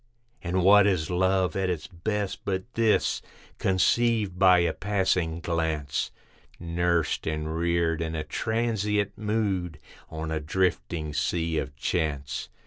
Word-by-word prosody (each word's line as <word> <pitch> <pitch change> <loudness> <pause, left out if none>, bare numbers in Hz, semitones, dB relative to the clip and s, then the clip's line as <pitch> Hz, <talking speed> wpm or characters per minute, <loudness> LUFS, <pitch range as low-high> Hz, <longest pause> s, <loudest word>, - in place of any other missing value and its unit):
And 90 0 0
what 100 +2 +7
is 90 -5 0
love 95 +1 +2
at 95 -1 0
its 85 -4 -2
best, 100 +3 -3
but 95 -1 -1
this? 115 -2 +2 0.4
Conceived 105 0 +2
by 95 -1 +7
a 85 -2 +2
passing 90 -4 0
glance, 80 -4 -1 0.5
Nursed 85 -1 0
and 80 0 -2
reared 85 -1 +1
in 80 0 -3
a 80 - -2
transient 105 +1 -1
mood, 100 -6 -1 0.3
on 80 0 -5
a 80 - -1
drifting 75 -2 -1
Sea 80 +1 0
of 70 - -5
Chance. 70 -2 -2
85 Hz, 130 wpm, -27 LUFS, 80-95 Hz, 0.5 s, what